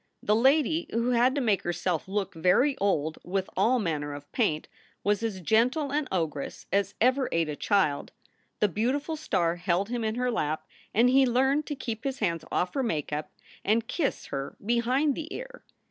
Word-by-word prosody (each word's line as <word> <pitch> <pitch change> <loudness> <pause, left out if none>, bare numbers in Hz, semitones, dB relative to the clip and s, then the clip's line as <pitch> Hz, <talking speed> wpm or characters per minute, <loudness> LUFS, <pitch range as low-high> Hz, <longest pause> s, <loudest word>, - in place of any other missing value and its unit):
The 210 - +3
lady 295 +7 +3
who 235 +2 0
had 250 +2 +3
to 285 - 0
make 215 -6 +2
herself 175 -1 -2
look 195 0 -2
very 180 - +3
old 160 -6 0
with 190 +1 -2
all 255 +3 +3
manner 150 -8 -2
of 145 0 -11
paint 180 -11 0 0.4
was 205 +1 +1
as 220 -4 -2
gentle 250 - +2
an 295 0 0
ogress 160 -6 -3
as 200 0 +1
ever 255 +2 +3
ate 165 -2 +1
a 150 - -3
child. 155 -7 +1 0.5
The 210 - +5
beautiful 260 - -1
star 175 - 0
held 180 +3 0
him 240 -1 -2
in 220 0 -1
her 250 0 0
lap, 155 -8 -1 0.3
and 235 +3 +4
he 265 +1 +5
learned 265 +5 +2
to 295 - -3
keep 230 -4 -5
his 270 -1 -2
hands 170 - -1
off 180 - 0
her 275 - 0
make 155 - -2
up 150 +1 -3 0.3
and 225 +3 +1
kiss 305 -6 -1
her 135 0 -4
behind 250 +6 +2
the 320 +3 -6
ear. - - -8
220 Hz, 190 wpm, -28 LUFS, 175-260 Hz, 0.5 s, The